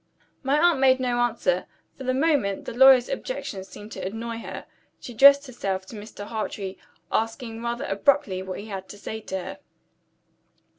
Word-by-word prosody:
My 275 +2 +2
aunt 340 -3 +4
made 260 -1 +5
no 245 -1 0
answer. 240 - 0 0.3
For 270 - -9
the 255 0 +1
moment, 270 -10 +1
the - - -5
lawyer's 260 0 +7
objections 220 - -5
seemed 210 +2 -11
to - - -6
annoy 225 +4 -4
her. - - -7 0.3
She 245 - -9
addressed 280 +4 +7
herself 195 -7 -3
to 220 - -11
Mr. 205 -1 -9
Hartrey; 205 -3 -5 0.3
asking 225 0 -2
rather 240 +3 -3
abruptly 195 -2 +1
what 190 -1 -6
he 205 - -8
had 195 -3 -7
to 205 - -9
say 220 +2 -6
to 190 - -4
her. 185 - -7
230 Hz, 175 wpm, -25 LUFS, 205-265 Hz, 0.3 s, lawyer's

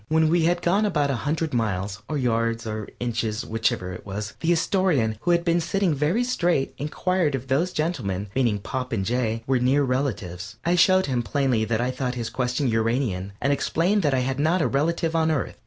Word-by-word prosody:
When 160 0 +3
we 165 0 +3
had 175 +1 +1
gone 195 +5 +3
about 150 -9 +1
a - - 0
hundred 160 -1 -1
miles 105 -3 -1
or 150 - -1
yards, 115 -2 0
or 110 -1 -4
inches, 115 -2 -2
whichever 110 -5 -1
it 90 - -9
was 105 +2 -5
the 165 - +1
Astorian, 160 - +1
who - - -2
had 170 0 +3
been 170 0 +2
sitting 180 +1 +1
very 150 - +1
straight, 175 - 0
inquired 155 +1 0
if 135 0 -6
those 150 +7 +1
gentlemen 115 - -2
meaning 120 -5 +2
Pop 130 +5 -4
and 95 -4 -1
Jay 115 -1 -1
were 130 -1 +2
near 135 +4 +3
relatives. 110 -8 -2
I 170 - +3
showed 185 +2 +5
him 125 -3 0
plainly 125 -3 0
that 110 +1 0
I 125 +1 0
thought 130 -1 -3
his 115 -2 -4
question 125 +3 -1
Uranian, 110 -4 0
and 140 - +2
explained 180 +8 +1
that 145 -5 +2
I 130 - +1
had 130 +1 -2
not 160 +5 +2
a 155 - +2
relative 165 +3 0
on 160 -1 +2
Earth. 155 -5 -2
135 Hz, 205 wpm, -24 LUFS, 115-165 Hz, -, showed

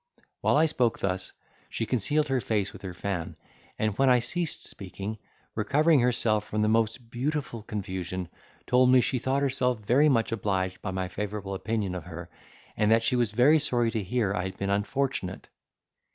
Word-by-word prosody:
While - - +3
I 155 - +5
spoke 125 -7 +1
thus, 95 -1 -2 0.4
she 115 - -2
concealed 145 +7 +1
her 130 -2 +1
face 105 -2 -1
with - - -11
her 95 -2 -6
fan, 90 -3 -3 0.4
and 110 -2 0
when 135 -1 +5
I 125 - +6
ceased 155 +7 -1
speaking, 100 +2 -6 0.3
recovering 145 +8 +3
herself 115 -4 +2
from 105 0 -1
the - - +2
most 115 +2 0
beautiful 135 -1 -2
confusion, 95 -3 -4 0.4
told 125 0 +4
me 130 0 +7
she 125 +1 +1
thought 135 +3 0
herself 130 -3 +1
very 130 +8 +3
much 115 -5 +2
obliged 95 -4 -1
by 105 - -4
my 95 -1 -2
favourable 100 +1 -4
opinion 105 -1 -2
of 90 -3 -6
her, 85 0 -8 0.4
and 105 - +2
that 115 +1 +4
she 120 - +2
was 120 -4 +1
very 130 +8 +5
sorry 120 -5 +1
to 110 - -1
hear 100 +1 0
I 95 -2 -2
had 95 0 -6
been 100 0 -2
unfortunate. 105 -2 -2
110 Hz, 180 wpm, -27 LUFS, 100-125 Hz, 0.4 s, me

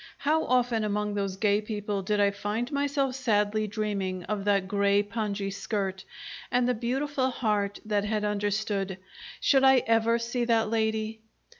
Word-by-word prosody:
How 310 +3 +1
often 245 -3 +2
among 210 0 -1
those 195 -2 -2
gay 205 0 +2
people 210 -2 -3
did 210 +2 0
I 200 -1 +4
find 210 +5 -3
myself 280 -2 0
sadly 215 -4 +1
dreaming 200 -3 -2
of 205 0 -3
that 200 -2 +2
grey 200 0 +2
pongee 205 -2 -3
skirt 195 -2 -3 0.5
and 245 0 +2
the 250 - +2
beautiful 260 +3 -1
heart 210 -5 -1
that 210 -1 0
had 210 0 -1
understood! 205 -2 -1 0.4
Should 270 -2 +4
I 265 -1 +6
ever 225 0 +3
see 235 +1 -2
that 225 -2 +2
lady? 220 0 -1
215 Hz, 155 wpm, -28 LUFS, 205-235 Hz, 0.5 s, I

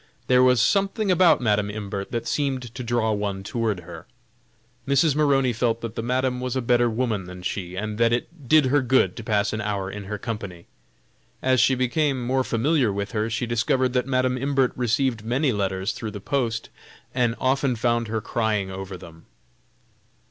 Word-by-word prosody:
There 125 0 +4
was 125 -1 +5
something 195 - +2
about 180 -5 +5
Madam 105 -3 +1
Imbert 100 -2 -5
that 115 - -3
seemed 130 -5 -2
to 125 - -6
draw 120 -2 0
one 100 -2 -2
toward 110 -3 -2
her. 85 0 -11 0.8
Mrs. 140 +2 +3
Maroney 135 -4 +3
felt 115 0 0
that 115 -2 -5
the 115 - -3
Madam 125 +1 0
was 125 0 -3
a 130 - 0
better 120 0 +3
woman 110 -4 -1
than 90 0 -10
she, 90 -1 -4
and 105 +2 -4
that 115 0 +4
it 135 +4 -3
did 155 -2 +6
her 140 +2 +3
good 130 +1 +2
to 115 - -7
pass 105 -1 0
an 110 - -2
hour 100 -2 -2
in 105 0 -7
her 105 +2 -4
company. 100 -6 -6 0.8
As 130 -1 +3
she 130 +1 +4
became 130 +2 0
more 130 +1 +1
familiar 130 0 +1
with 100 0 -3
her, 110 -1 -1
she 120 +2 -2
discovered 120 +2 +1
that 125 0 0
Madam 130 -1 +1
Imbert 135 -1 +1
received 120 -1 0
many 130 +5 +1
letters 95 -2 -1
through 110 - -5
the 105 - -7
post, 115 0 -2 0.4
and 120 -2 +1
often 130 0 +1
found 120 0 0
her 110 0 -2
crying 105 -4 -1
over 95 0 -6
them. 80 -1 -14
120 Hz, 185 wpm, -24 LUFS, 105-130 Hz, 0.8 s, did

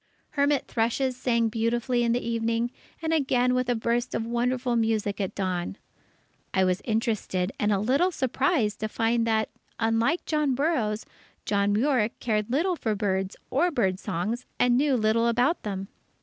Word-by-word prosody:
Hermit 285 -1 +2
thrushes 250 +3 0
sang 235 -2 +1
beautifully 240 +2 0
in 235 - +2
the 240 0 -1
evening, 230 +1 0 0.3
and 320 0 0
again 250 -5 +2
with 255 -1 0
a 245 - +2
burst 235 +2 -1
of 225 - -1
wonderful 245 +1 0
music 220 -3 0
at 190 - -3
dawn. 185 0 -2 0.8
I 190 - +4
was 185 0 +1
interested 215 -5 -1
and 210 0 +2
a 200 - +3
little 265 - +2
surprised 265 - 0
to 215 - -1
find 230 +1 +1
that, 220 -1 +1 0.3
unlike 225 +8 +1
John 300 -4 +1
Burroughs, 245 -8 0 0.4
John 200 0 +1
Muir 235 -1 +2
cared 215 -2 -1
little 340 +9 +1
for 220 -9 -1
birds 195 -1 -1 0.2
or 325 +7 +3
bird 195 - 0
songs, 210 +10 -3
and 245 -1 +3
knew 275 +1 +3
little 230 0 +2
about 245 +8 +2
them. 195 -2 -4
230 Hz, 165 wpm, -26 LUFS, 215-255 Hz, 0.8 s, I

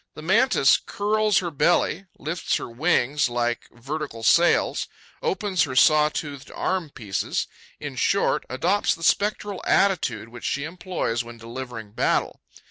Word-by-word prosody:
The 155 - -9
Mantis 200 - +4
curls 215 0 +1
her 175 -2 0
belly; 175 +5 +1
lifts 165 +5 -2
her - - -3
wings 140 +1 +1
like 120 0 -1
vertical 135 -1 -6
sails; 170 +8 +3 0.3
opens 210 - 0
her 130 -3 -6
saw 150 +3 +5
toothed 145 -3 -6
arm 185 -4 -2
pieces; 105 -8 -3 0.3
in - - -6
short, - - +1
adopts 180 +10 +1
the 165 - -11
spectral 205 +1 +1
attitude 145 - +1
which 120 0 -11
she 140 - -1
employs 165 -8 -3
when 120 0 -11
delivering 115 -2 -8
battle. - - 0
150 Hz, 135 wpm, -24 LUFS, 120-185 Hz, 0.3 s, saw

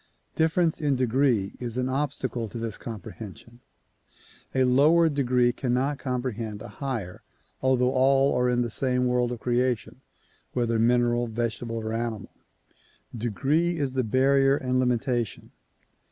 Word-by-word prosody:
Difference 160 0 +1
in 145 -3 +2
degree 125 -5 +1
is 120 -1 -4
an 125 0 0
obstacle 130 -4 -2
to 115 - -7
this 115 -2 -4
comprehension. 110 +1 -9 1.0
A 130 - +4
lower 150 +6 +5
degree 125 -4 +2
cannot 130 +3 -1
comprehend 120 -5 -3
a - - -7
higher 120 -10 -5 0.4
although 130 -1 +2
all 135 +1 +3
are 125 0 +2
in 120 0 +2
the 120 - -4
same 125 +1 0
world 125 -1 +1
of 120 - -5
creation, 125 -1 -1 0.5
whether 115 -2 0
mineral, 120 +1 +2
vegetable 115 0 -3
or 110 -1 -3
animal. 115 -3 -4 0.8
Degree 140 - 0
is 140 -4 -1
the 130 -1 0
barrier 135 +4 +3
and 130 -3 0
limitation. 120 -2 -1
125 Hz, 135 wpm, -26 LUFS, 115-135 Hz, 1.0 s, lower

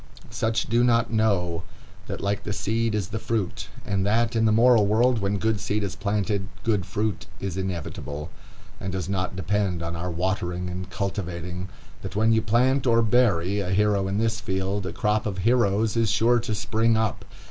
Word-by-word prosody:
Such 110 0 0
do 120 +2 +3
not 115 -1 +2
know 90 -6 +1 0.5
that - - -5
like 100 0 -1
the 105 - -3
seed 110 +2 0
is 100 -4 -2
the 110 - -3
fruit, 110 -5 -2 0.2
and 100 -2 0
that, 115 +3 +1
in 115 0 +3
the 110 - +4
moral 115 -1 +5
world, 120 +3 +3
when 100 0 0
good 110 0 0
seed 105 +2 -1
is 100 - -3
planted, 100 -1 -1 0.2
good 105 -5 0
fruit 105 -2 -2
is 95 -3 -4
inevitable, 85 -5 -4 0.5
and 95 - -4
does 95 -2 -3
not 95 -2 -2
depend 95 -3 -1
on 85 0 -3
our 90 +2 -3
watering 90 0 -2
and 90 0 -5
cultivating; 90 -1 -4 0.3
that - - -7
when 110 +2 +3
you 110 - +3
plant, 125 +5 +2
or 115 -1 +4
bury, 105 -5 +2
a 95 -3 -2
hero 100 0 +2
in 95 +1 -1
his 110 0 0
field, 95 0 -2
a - - -3
crop 105 +4 0
of 100 -2 -3
heroes 110 0 +2
is 115 -2 +2
sure 115 +2 +3
to 110 -2 -2
spring 110 +2 +1
up. 110 -3 -1
105 Hz, 190 wpm, -25 LUFS, 95-110 Hz, 0.5 s, moral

